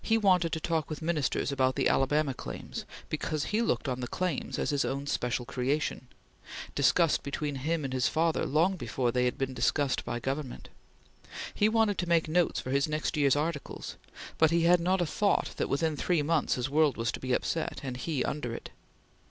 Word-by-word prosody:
He 225 Hz, -, +3 dB
wanted 185 Hz, -6 st, +3 dB
to 160 Hz, -, -1 dB
talk 160 Hz, -1 st, -1 dB
with 155 Hz, 0 st, -5 dB
Ministers 150 Hz, -4 st, 0 dB
about 130 Hz, -1 st, +1 dB
the -, -, +2 dB
Alabama 145 Hz, +1 st, +2 dB
Claims, -, -, -7 dB, 0.2 s
because 155 Hz, -2 st, -2 dB
he 215 Hz, +2 st, 0 dB
looked 230 Hz, -, 0 dB
on 125 Hz, -1 st, -2 dB
the 125 Hz, -, -3 dB
Claims 180 Hz, +1 st, -2 dB
as -, -, 0 dB
his 145 Hz, -1 st, +1 dB
own 140 Hz, +1 st, -2 dB
special 125 Hz, -3 st, -1 dB
creation, 130 Hz, +1 st, -1 dB, 0.7 s
discussed 170 Hz, -3 st, +3 dB
between 145 Hz, 0 st, -3 dB
him 155 Hz, +4 st, -1 dB
and 130 Hz, -, -4 dB
his 130 Hz, -1 st, +2 dB
father 165 Hz, 0 st, +1 dB
long 170 Hz, +6 st, +2 dB
before 125 Hz, -7 st, -1 dB
they 125 Hz, +1 st, +1 dB
had 125 Hz, -, 0 dB
been 135 Hz, -1 st, -2 dB
discussed 130 Hz, +3 st, +1 dB
by 120 Hz, -, -3 dB
Government; 135 Hz, +1 st, -4 dB, 0.8 s
he 210 Hz, -, +3 dB
wanted 220 Hz, -2 st, +2 dB
to 175 Hz, -, -2 dB
make 165 Hz, -2 st, +3 dB
notes 170 Hz, +2 st, +2 dB
for 130 Hz, -, -5 dB
his 140 Hz, +2 st, +2 dB
next 155 Hz, 0 st, -1 dB
year's 140 Hz, -3 st, +4 dB
articles; 150 Hz, 0 st, -3 dB, 0.4 s
but 160 Hz, -, +6 dB
he 170 Hz, +1 st, +2 dB
had 175 Hz, +1 st, +5 dB
not 185 Hz, +2 st, +1 dB
a -, -, +2 dB
thought 200 Hz, +6 st, +1 dB
that, -, -, -1 dB
within 155 Hz, +2 st, +1 dB
three 165 Hz, +1 st, +1 dB
months, 155 Hz, 0 st, +1 dB
his 125 Hz, +1 st, -1 dB
world 150 Hz, 0 st, +2 dB
was 115 Hz, 0 st, 0 dB
to -, -, -6 dB
be 130 Hz, -, -4 dB
upset, 160 Hz, +5 st, -1 dB
and 130 Hz, -2 st, -4 dB
he 140 Hz, 0 st, -1 dB
under 125 Hz, -6 st, -3 dB
it. -, -, -8 dB
150 Hz, 200 wpm, -29 LUFS, 130-170 Hz, 0.8 s, but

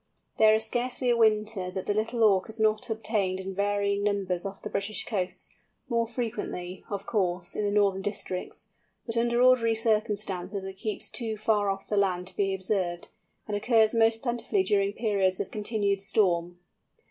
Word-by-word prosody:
There 215 Hz, 0 st, +7 dB
is 220 Hz, 0 st, 0 dB
scarcely 245 Hz, +2 st, 0 dB
a -, -, +3 dB
winter 215 Hz, -4 st, +2 dB
that 185 Hz, 0 st, -5 dB
the 205 Hz, -, +1 dB
Little 225 Hz, +2 st, 0 dB
Auk 195 Hz, -1 st, +4 dB
is 220 Hz, +1 st, -9 dB
not 215 Hz, 0 st, +1 dB
obtained 210 Hz, -4 st, -1 dB
in 190 Hz, 0 st, -5 dB
varying 200 Hz, 0 st, 0 dB
numbers 195 Hz, -3 st, -1 dB
off 195 Hz, 0 st, -9 dB
the -, -, -4 dB
British 200 Hz, +2 st, -1 dB
coasts, 190 Hz, -5 st, -3 dB, 0.4 s
more 230 Hz, -1 st, +1 dB
frequently, 220 Hz, -6 st, -4 dB
of 200 Hz, -1 st, -4 dB
course, 180 Hz, -4 st, -1 dB
in 210 Hz, -, -1 dB
the -, -, +1 dB
northern 200 Hz, -2 st, +2 dB
districts, 195 Hz, -2 st, -4 dB, 0.4 s
but 230 Hz, -, -4 dB
under 235 Hz, +1 st, +2 dB
ordinary 240 Hz, -3 st, +5 dB
circumstances 210 Hz, -3 st, -1 dB
it 190 Hz, 0 st, -6 dB
keeps 205 Hz, +2 st, -4 dB
too 225 Hz, -3 st, -3 dB
far 210 Hz, -1 st, +1 dB
off 195 Hz, 0 st, -3 dB
the 210 Hz, -, -1 dB
land 185 Hz, -3 st, +1 dB
to 185 Hz, -, -17 dB
be 195 Hz, -1 st, +1 dB
observed, 190 Hz, -2 st, -2 dB, 0.4 s
and 210 Hz, -, -2 dB
occurs 220 Hz, +1 st, +3 dB
most 225 Hz, 0 st, +3 dB
plentifully 235 Hz, -5 st, 0 dB
during 200 Hz, 0 st, +1 dB
periods 200 Hz, -4 st, +1 dB
of -, -, -3 dB
continued 205 Hz, -2 st, -1 dB
storm. 180 Hz, -4 st, +1 dB
205 Hz, 175 wpm, -28 LUFS, 195-220 Hz, 0.4 s, There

